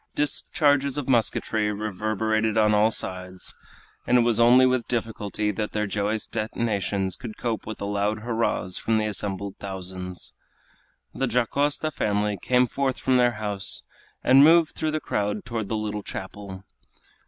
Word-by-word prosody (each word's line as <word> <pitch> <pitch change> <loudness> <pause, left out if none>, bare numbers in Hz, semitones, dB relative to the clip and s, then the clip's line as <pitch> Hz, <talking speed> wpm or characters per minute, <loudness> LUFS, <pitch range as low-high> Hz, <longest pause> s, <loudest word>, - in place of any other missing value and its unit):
Discharges 145 -1 +1
of 145 - -3
musketry 110 -3 +1
reverberated 110 +1 -1
on 105 -1 +4
all 105 +1 +4
sides, 95 -3 -3 0.5
and 125 - +5
it - - +5
was 115 -1 +2
only 125 +2 +7
with 130 -2 +1
difficulty 105 -3 -2
that 105 +1 -4
their 105 0 0
joyous 105 +2 -1
detonations 105 -4 -2
could 115 -4 -8
cope 115 -3 -3
with 110 - -5
the - - -5
loud 105 +1 -1
hurrahs 115 -5 -1
from 110 -1 +1
the 110 - +1
assembled 100 -1 -4
thousands. 95 -2 -5 0.8
The 135 - -1
Dacosta 140 +6 0
family 105 -5 -1
came 125 0 +3
forth 135 +1 -1
from 130 -1 +2
their 120 -1 +4
house 105 -3 -2 0.4
and 135 +2 +7
moved 165 +1 +5
through 155 - -1
the 155 0 -1
crowd 105 -5 -2
toward 115 -3 -4
the 110 - -1
little 105 -1 -3
chapel. 100 -3 -8
110 Hz, 155 wpm, -25 LUFS, 100-125 Hz, 0.8 s, only